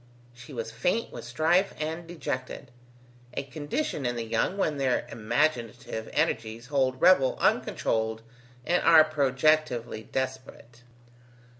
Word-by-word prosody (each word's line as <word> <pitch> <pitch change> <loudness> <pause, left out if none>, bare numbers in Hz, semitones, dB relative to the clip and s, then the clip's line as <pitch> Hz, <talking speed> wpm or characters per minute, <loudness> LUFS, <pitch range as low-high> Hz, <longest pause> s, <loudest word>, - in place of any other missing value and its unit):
She 125 +4 -13
was 115 -3 -5
faint 180 - -1
with - - -7
strife 160 +10 +2
and 160 +2 -4
dejected, 135 -6 -5 0.6
a - - -2
condition 145 - -3
in 120 -1 -1
the 115 -1 -3
young 115 - 0
when 155 -7 0
their 130 -2 +1
imaginative 115 -1 -1
energies 115 -7 -1
hold 130 -2 0
revel 170 -8 +5
uncontrolled 110 0 0 0.4
and 175 +1 +2
are 160 -2 +8
projectively 140 -5 +1
desperate. 130 -2 -5
130 Hz, 120 wpm, -27 LUFS, 120-155 Hz, 0.6 s, are